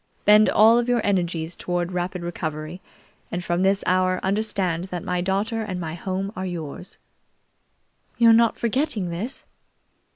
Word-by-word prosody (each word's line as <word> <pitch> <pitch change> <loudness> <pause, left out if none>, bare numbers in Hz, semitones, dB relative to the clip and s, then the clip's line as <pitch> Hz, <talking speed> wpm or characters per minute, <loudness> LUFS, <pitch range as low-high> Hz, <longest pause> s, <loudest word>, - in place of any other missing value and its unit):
Bend 210 +1 +6
all 225 +3 +6
of 240 0 -1
your 240 -2 +1
energies 175 -4 -1
toward 175 0 -2
rapid 180 0 -3
recovery, 160 0 -5 0.5
and 175 +1 -3
from 175 +1 0
this 195 +1 +2
hour 185 0 +2
understand 190 -4 0
that 180 -3 -6
my 180 0 -1
daughter 200 +5 -1
and 190 -4 -4
my 160 -2 -4
home 190 +3 -3
are 185 - -4
yours." 175 -1 -6 1.2
"You're 230 -1 +6
not 230 0 +4
forgetting 235 - -1
this?" 215 +11 -5
185 Hz, 150 wpm, -23 LUFS, 175-215 Hz, 1.2 s, Bend